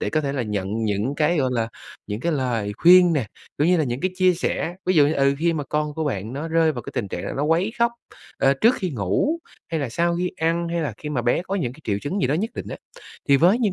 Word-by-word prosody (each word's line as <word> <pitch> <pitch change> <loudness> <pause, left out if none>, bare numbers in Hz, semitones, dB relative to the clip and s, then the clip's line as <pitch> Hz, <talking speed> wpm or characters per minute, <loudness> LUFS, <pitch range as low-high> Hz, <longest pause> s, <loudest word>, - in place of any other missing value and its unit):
để - - -2
có 155 - +1
thể 140 -2 -2
là 135 -3 -1
nhận 105 0 -2
những 105 +6 -1
cái, 155 +3 +2
gọi 130 -3 +1
là, 115 -2 0 0.4
những 105 +2 -4
cái 170 +5 0
lời 120 -7 -1
khuyên 180 +1 +7
nè, 140 -8 0 0.3
cũng 150 - +3
như 180 +1 +4
là 160 - +1
những 125 0 -3
cái 185 - 0
chia 185 0 +4
sẻ. 175 0 -2
Ví 185 - +2
dụ 145 -3 +6
như, 150 - +1
ừ, 140 -1 +3
khi 170 +2 +2
mà 150 -3 -3
con 150 +2 -2
của 160 - -2
bạn 110 -6 -3
nó 145 +5 -4
rơi 165 -1 +3
vào 120 -4 -6
cái - - -8
tình 100 - -2
trạng 90 - -5
nó 140 - -1
quấy 170 +7 +1
khóc, 235 0 +3 0.5
ờ, 135 0 +4
trước 235 +3 +5
khi 185 -6 -3
ngủ 120 - 0 0.3
hay 165 -2 -1
là 140 - -2
sau 170 +7 0
khi 180 +1 -1
ăn, 165 +1 0
hay 170 0 -1
là 150 - -2
khi 150 - -7
mà 135 -5 -1
bé 120 +8 +1
có 190 +2 -4
những 150 -12 -1
cái 145 - -16
triệu 100 -2 -1
chứng 185 +8 -2
gì - - +2
đó 135 - +1
nhất 210 +8 -1
định - - -6
á, - - -5 0.5
thì 140 - +6
với 180 - +4
những 220 -6 +1
150 Hz, 290 wpm, -23 LUFS, 125-170 Hz, 0.5 s, khuyên